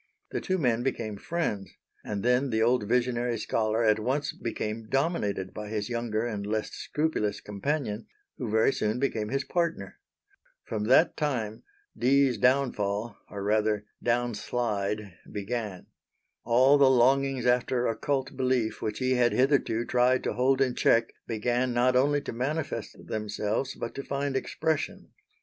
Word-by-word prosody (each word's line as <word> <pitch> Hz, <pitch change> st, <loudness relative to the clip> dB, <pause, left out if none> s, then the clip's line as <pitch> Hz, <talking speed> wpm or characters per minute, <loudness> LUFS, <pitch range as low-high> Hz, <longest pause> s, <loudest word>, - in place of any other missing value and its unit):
The -, -, -2 dB
two 185 Hz, -, 0 dB
men 120 Hz, -7 st, +1 dB
became 115 Hz, -5 st, -2 dB
friends, 105 Hz, -, -3 dB, 0.3 s
and 100 Hz, -2 st, -4 dB
then 125 Hz, +3 st, +2 dB
the 110 Hz, -1 st, +1 dB
old 120 Hz, -2 st, +2 dB
visionary 120 Hz, -1 st, +1 dB
scholar 110 Hz, +1 st, 0 dB
at 110 Hz, -1 st, +4 dB
once 135 Hz, +6 st, -1 dB
became 110 Hz, -1 st, -4 dB
dominated 120 Hz, -, 0 dB
by 105 Hz, -1 st, -6 dB
his 105 Hz, 0 st, -3 dB
younger 115 Hz, -2 st, -1 dB
and 105 Hz, -4 st, -3 dB
less 105 Hz, +1 st, -2 dB
scrupulous 150 Hz, -9 st, -1 dB
companion, 110 Hz, +1 st, -3 dB, 0.3 s
who 125 Hz, -5 st, -3 dB
very 110 Hz, +5 st, +3 dB
soon 105 Hz, +2 st, -1 dB
became 115 Hz, -5 st, -1 dB
his 135 Hz, +2 st, -1 dB
partner. 170 Hz, +1 st, -2 dB, 0.6 s
From 105 Hz, -1 st, -3 dB
that 135 Hz, +8 st, +5 dB
time 120 Hz, -8 st, -2 dB, 0.3 s
Dee's 135 Hz, 0 st, +3 dB
down 130 Hz, 0 st, +3 dB
fall 105 Hz, +2 st, -2 dB
or 100 Hz, -1 st, -6 dB
rather 105 Hz, 0 st, +1 dB, 0.2 s
down 120 Hz, 0 st, +1 dB
slide 105 Hz, -3 st, -2 dB, 0.2 s
began. 105 Hz, -2 st, -4 dB, 0.6 s
All 130 Hz, +5 st, +5 dB
the 135 Hz, -2 st, +7 dB
longings 130 Hz, +1 st, +3 dB
after 125 Hz, 0 st, +2 dB
occult 135 Hz, +4 st, -1 dB
belief 125 Hz, -4 st, 0 dB
which 105 Hz, -1 st, -2 dB
he 130 Hz, 0 st, 0 dB
had 125 Hz, -2 st, +3 dB
hitherto 130 Hz, -3 st, +2 dB
tried 125 Hz, +1 st, +2 dB
to -, -, -1 dB
hold 130 Hz, +2 st, +2 dB
in 130 Hz, -2 st, +2 dB
check 115 Hz, -1 st, +2 dB
began 120 Hz, +2 st, 0 dB
not 125 Hz, +1 st, +3 dB
only 145 Hz, +3 st, +3 dB
to -, -, -6 dB
manifest 140 Hz, +6 st, -3 dB
themselves, 105 Hz, +4 st, -2 dB
but 115 Hz, -, -5 dB
to 140 Hz, -, -5 dB
find 140 Hz, 0 st, -2 dB
expression. 155 Hz, +3 st, -2 dB
120 Hz, 150 wpm, -28 LUFS, 110-135 Hz, 0.6 s, the